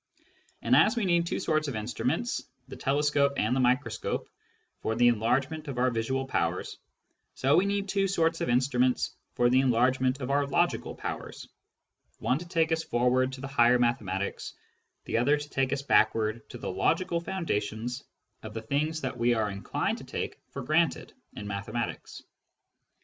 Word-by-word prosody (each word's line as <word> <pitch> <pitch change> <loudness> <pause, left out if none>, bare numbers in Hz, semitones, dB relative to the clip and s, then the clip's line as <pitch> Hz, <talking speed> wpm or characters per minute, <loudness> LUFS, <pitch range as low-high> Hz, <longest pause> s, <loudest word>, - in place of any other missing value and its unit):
And - - +4
as 220 +3 +5
we 230 -4 0
need 170 -2 +2
two - - -2
sorts 155 -1 0
of 135 - -3
instruments, 125 - -2 0.3
the - - -9
telescope 140 0 +2
and 110 +4 +1
the - - +1
microscope, 125 -3 0 0.5
for 110 - -2
the 120 +1 +5
enlargement 135 +7 0
of 135 -3 -5
our 125 +1 +2
visual 130 +4 -1
powers, 85 -8 -2 0.6
so 135 +2 +3
we 190 +3 +4
need 200 0 -1
two 195 0 +1
sorts 165 -3 +1
of - - -1
instruments 125 0 +1 0.2
for 120 - +3
the 125 +2 +4
enlargement 130 +1 +2
of 130 0 -3
our 140 0 +2
logical 170 +5 0
powers, - - -6 0.7
one 130 - 0
to 175 - -9
take 165 -2 +1
us 160 0 +1
forward 125 +1 +2
to 130 - -8
the 135 - -4
higher 125 -2 +4
mathematics, 105 -6 -1 0.5
the - - 0
other 145 +5 +3
to 145 0 -7
take 135 -1 0
us 140 0 -1
backward 110 -4 +2
to - - -8
the - - -4
logical 175 -2 +1
foundations 125 - -3 0.4
of 110 0 -9
the 110 - -3
things 155 +6 -1
that 130 -2 -4
we 120 0 +3
are 110 -2 0
inclined 100 0 -2
to - - -10
take - - -5
for - - -6
granted - - +1 0.2
in 105 - -7
mathematics. 105 +4 -4
130 Hz, 170 wpm, -28 LUFS, 120-150 Hz, 0.7 s, as